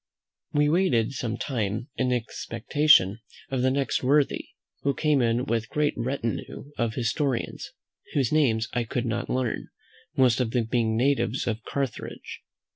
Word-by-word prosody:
We 145 0 +3
waited 150 - +2
some 120 -4 -3
time 115 -1 -2
in 125 -1 0
expectation 115 -2 +2 0.3
of 130 -2 0
the 130 - +3
next 135 -1 0
worthy, 140 +2 +2 0.4
who 140 -1 0
came 150 -2 +2
in 120 +1 +1
with 115 0 0
a - - -22
great 150 -1 +1
retinue 125 +2 -3
of 115 -2 -1
historians, 125 +2 -1 0.5
whose 135 -5 +2
names 115 -8 +3
I 120 - +1
could 120 +2 -2
not 120 +1 -2
learn, 125 -3 -1 0.5
most 125 -2 +4
of 125 -3 +1
them 120 -3 +2
being 115 -1 +1
natives 135 -1 +1
of 115 -1 -2
Carthage. 135 -4 -4
125 Hz, 150 wpm, -26 LUFS, 115-140 Hz, 0.5 s, most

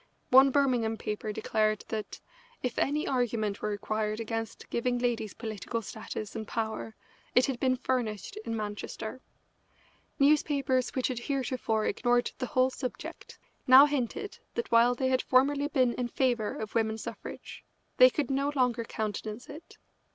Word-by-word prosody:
One 265 +2 +8
Birmingham 250 -5 +2
paper 210 0 -4
declared 215 0 0
that 215 -2 -4 0.4
"if 250 -2 -1
any 295 +2 +1
argument 225 -5 0
were 215 - -1
required 215 +1 -2
against 225 0 -4
giving 245 +1 0
ladies 235 -4 -1
political 225 +1 -4
status 215 0 -6
and 220 -1 -5
power 220 -1 -3 0.4
it 250 - +6
had 265 -3 -3
been 255 -1 +2
furnished 230 - -2
in 425 - -4
Manchester." 215 +3 -5 1.0
Newspapers 275 -3 +3
which 260 0 +1
had 250 -2 -3
heretofore 250 -4 -1
ignored 245 0 +1
the 255 - -2
whole 260 -2 +2
subject 255 -1 -7 0.3
now 260 +2 +10
hinted 290 - -3 0.2
that 470 - -3
while 235 +1 +5
they 260 +1 0
had 255 0 +2
formerly 280 +3 +3
been 255 -5 +2
in 245 0 -2
favour 240 -4 0
of 215 -1 -6
women's 220 -1 0
suffrage, - - -8 0.3
they 255 - +9
could 285 +2 -2
no 275 +2 +1
longer 250 -3 +2
countenance 215 +1 -5
it. 315 - -11
245 Hz, 150 wpm, -29 LUFS, 220-260 Hz, 1.0 s, now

